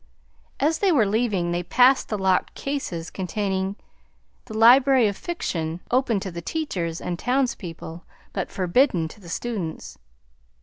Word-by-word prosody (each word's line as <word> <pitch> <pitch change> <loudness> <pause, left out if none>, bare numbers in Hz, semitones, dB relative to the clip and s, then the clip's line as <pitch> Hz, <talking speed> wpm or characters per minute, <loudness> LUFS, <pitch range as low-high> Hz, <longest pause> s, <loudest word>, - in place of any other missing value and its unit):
As 310 +3 +1
they 395 -2 +3
were 260 -10 +4
leaving 200 -5 0
they 175 0 0
passed 250 +9 +4
the 210 - -1
locked 190 -1 +1
cases 270 - -4
containing 190 +1 -2 0.7
the 220 -3 -7
library 255 +1 +6
of 200 - -2
fiction, 170 - -3
open 245 -4 +2
to 190 - -5
the 170 0 -6
teachers 175 - -3
and 175 -1 -4
townspeople, 180 -10 -2 0.3
but - - -3
forbidden 185 - +2
to 210 - -14
the 175 - -12
students. 190 -5 -5
200 Hz, 140 wpm, -24 LUFS, 175-255 Hz, 0.7 s, library